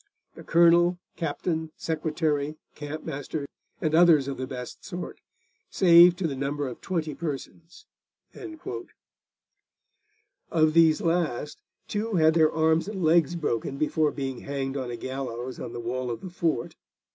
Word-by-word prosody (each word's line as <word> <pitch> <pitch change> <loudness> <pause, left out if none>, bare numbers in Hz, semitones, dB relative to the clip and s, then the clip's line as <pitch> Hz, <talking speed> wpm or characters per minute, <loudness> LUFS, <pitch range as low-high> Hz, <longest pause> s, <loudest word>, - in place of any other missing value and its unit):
The - - -12
Colonel, 170 +1 +4 0.2
Captain, 160 0 -2
Secretary, 155 -2 -1 0.2
Campmaster, 145 -1 -5 0.3
and 155 -1 -1
others 160 -4 +6
of 140 - -4
the 130 - -4
best 125 -2 -8
sort, 180 -3 -7 0.5
saved 175 -1 +7
to 180 -3 -1
the 140 - -4
number 140 +1 -2
of 125 - -8
20 160 -5 -2
persons.' 165 - -7 2.6
Of 155 -2 +3
these 160 -1 +5
last, 165 -5 -1 0.3
two 210 +1 -2
had 160 -2 +5
their 160 -1 +4
arms 160 +2 +2
and 200 -3 -4
legs 165 0 +3
broken 140 -4 -2
before 155 +1 +1
being 135 -3 -4
hanged 135 -1 -4
on 130 -3 -3
a 120 - -5
gallows 130 -1 -5
on - - -6
the 120 - -6
wall 125 +2 -3
of 115 - -4
the 185 - -8
fort. 165 -8 -1
155 Hz, 140 wpm, -26 LUFS, 135-170 Hz, 2.6 s, saved